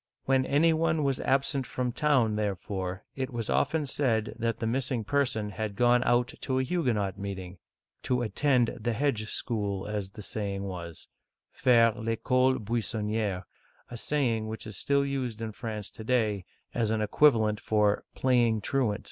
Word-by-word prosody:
When 130 -1 +2
any 160 +4 +4
one 160 -1 +1
was 135 -2 +1
absent 135 0 +1
from 125 -1 -2
town, 125 -6 +2
therefore, 95 -2 -3
it 130 -1 -2
was 115 -3 -3
often 150 +2 +1
said 120 -6 0
that 115 0 0
the - - -3
missing 125 0 0
person 120 -5 0
had 105 0 -4
gone 120 +2 +4
out 120 0 +2
to 130 -1 -1
a 130 - +2
Huguenot 115 - 0
meeting, 95 -2 -6 0.2
— - - -54
"to 125 -1 +2
attend 125 0 +2
the 120 +1 -1
hedge 115 -3 0
school,*' 100 -5 -2
as 105 -2 -3
the 105 +2 -10
saying 100 -1 -3
was 85 -4 -7 0.6
{/aire 115 -3 +6
F^cole 125 +3 +1
buissonni^re)^ 105 -3 -1 0.2
— - - -31
a - - -5
saying 115 -5 0
which 110 +1 -6
is 110 -2 -7
still 140 +7 +1
used 130 -5 -3
in 110 -1 -4
France 105 -2 -6
to 110 - -9
day 110 -6 +1 0.3
as 115 -3 0
an 110 0 0
equivalent 110 -3 +3
for 105 -2 +2
" - - -42
playing 120 -4 +3
truant. 120 -4 0
115 Hz, 170 wpm, -29 LUFS, 105-130 Hz, 0.6 s, aire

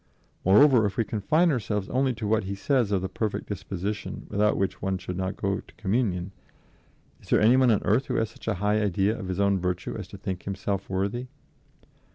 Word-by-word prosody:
Moreover, 115 +3 +6
if 100 - -6
we 115 - +3
confine 150 - +2
ourselves 105 -6 -1
only 130 +1 +1
to 110 -1 -5
what 105 -1 +1
he 100 +1 -3
says 120 0 +1
of 95 -2 +1
the - - -1
perfect 105 +2 -3
disposition 100 +1 -4
without 105 +1 +2
which 95 -2 -1
one 95 -1 -1
should 90 0 -6
not 95 +2 -2
go 100 -1 -1
to - - -15
Communion, 95 -4 -1 0.9
is - - -18
there - - +4
anyone 125 +4 +5
on 110 - +2
earth 115 +6 +2
who 130 - -2
has 115 -2 0
such - - -15
a 110 - +1
high 105 +3 +1
idea 100 +1 +1
of 110 -5 -6
his 95 0 -3
own 100 -1 +3
virtue 90 0 -2
as - - -6
to - - -10
think 95 -2 -4
himself 100 0 -3
worthy? 100 +7 -2
100 Hz, 210 wpm, -26 LUFS, 95-115 Hz, 0.9 s, Moreover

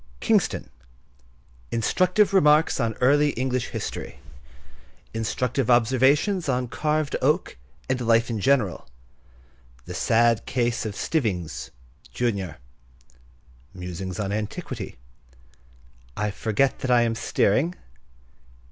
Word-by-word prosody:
Kingston.—Instructive 60 - -1
remarks 150 -5 +4
on 115 -3 0
early 145 +3 +4
English 130 0 -1
history.—Instructive 110 - -6
observations 130 - +3
on 125 -1 0
carved 150 +3 -1
oak 150 +7 +1 0.3
and 130 0 -1
life 115 -1 +3
in 110 - -2
general.—Sad 65 - -1
case 120 -2 0
of 105 - -6
Stivvings, 90 - -2 0.5
junior.—Musings 65 - -7
on 100 -2 -2
antiquity.—I 60 - -8
forget 110 +6 0
that 130 - -3
I 120 -1 +5
am 115 -1 0
steering. 130 - +1
110 Hz, 80 wpm, -24 LUFS, -, 0.5 s, I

